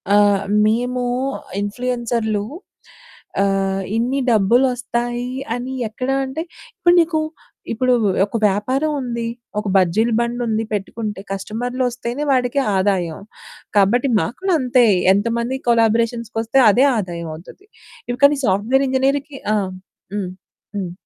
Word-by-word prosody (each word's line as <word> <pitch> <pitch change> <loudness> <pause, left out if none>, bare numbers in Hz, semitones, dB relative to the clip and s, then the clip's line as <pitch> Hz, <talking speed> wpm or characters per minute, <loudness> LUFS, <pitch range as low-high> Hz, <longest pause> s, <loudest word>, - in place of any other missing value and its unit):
ఆహ్, 205 -1 +4 0.2
మేము 245 +3 0 0.6
ఇన్‌ఫ్లుయెన్సర్లు 230 -1 -1 1.0
ఆహ్, 195 -1 0
ఇన్ని 245 +4 0
డబ్బులోస్తాయి 240 +2 +1 0.2
అని 250 +2 -5
ఎక్కడ 255 +4 -5 0.2
అంటే 265 +4 -4 0.4
ఇప్పుడు 345 - +4
నీకు 325 -1 0 0.5
ఇప్పుడు 255 +2 +2 0.3
ఒక 205 - -9
వ్యాపారం 255 +10 +1
ఉంది, 235 -2 -3 0.3
ఒక 210 - -6
బజ్జీల 195 +5 +3
బండుంది 235 -2 -1
పెట్టుకుంటే, 210 0 -4
కస్టమర్లు 240 +6 -3
ఓస్తేనే 245 +3 -4
వాడికి 255 +1 +1 0.2
ఆదాయం. 185 -4 0 0.6
కాబట్టి 235 +7 +3
మాకు 235 - -3
కూడా 380 -2 +2
అంతే. 250 -1 +4 0.3
ఎంతమంది 235 +5 -1
కొలాబరేషన్స్‌కొస్తే 230 +1 +1
అదే 245 +6 +4
ఆదాయమోవుతుంది. 170 - -6 0.5
ఇంక 280 +3 +5
నీ 285 - -3
సాఫ్ట్వేర్ 220 +8 +2
ఇంజినీర్‌కి 275 +2 0 0.2
ఆ! - - +3 0.6
హ్మ్. 195 -3 -2 0.5
హ్మ్. 185 -3 -3
235 Hz, 110 wpm, -20 LUFS, 205-255 Hz, 1.0 s, ఇంక